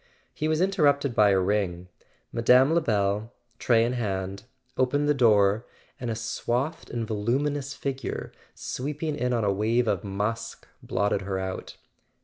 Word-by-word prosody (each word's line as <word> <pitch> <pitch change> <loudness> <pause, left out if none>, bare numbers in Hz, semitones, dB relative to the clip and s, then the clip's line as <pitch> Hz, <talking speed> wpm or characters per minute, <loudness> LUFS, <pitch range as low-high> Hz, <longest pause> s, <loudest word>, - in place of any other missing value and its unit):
He 155 - -2
was 155 +1 +1
interrupted 145 -8 +2
by 105 -2 +5
a 95 -1 +4
ring. 90 -2 -1 0.5
Mme. 125 +5 +5
Lebel, 105 -8 +1 0.3
tray 115 -2 +3
in 120 - -1
hand, 100 -4 -3 0.3
opened 145 +3 +1
the 150 - +4
door, 110 -4 +3 0.3
and 125 - -4
a 115 - -1
swathed 120 +6 -2
and 115 -1 -3
voluminous 135 +6 -1
figure, 135 -1 -4 0.2
sweeping 150 +3 -4
in 125 -1 -1
on 115 -2 +1
a 100 -1 +2
wave 115 +4 +1
of 100 -4 0
musk, 105 +3 -3
blotted 100 -1 0
her 95 0 -3
out. 95 0 -5
115 Hz, 145 wpm, -26 LUFS, 100-140 Hz, 0.5 s, by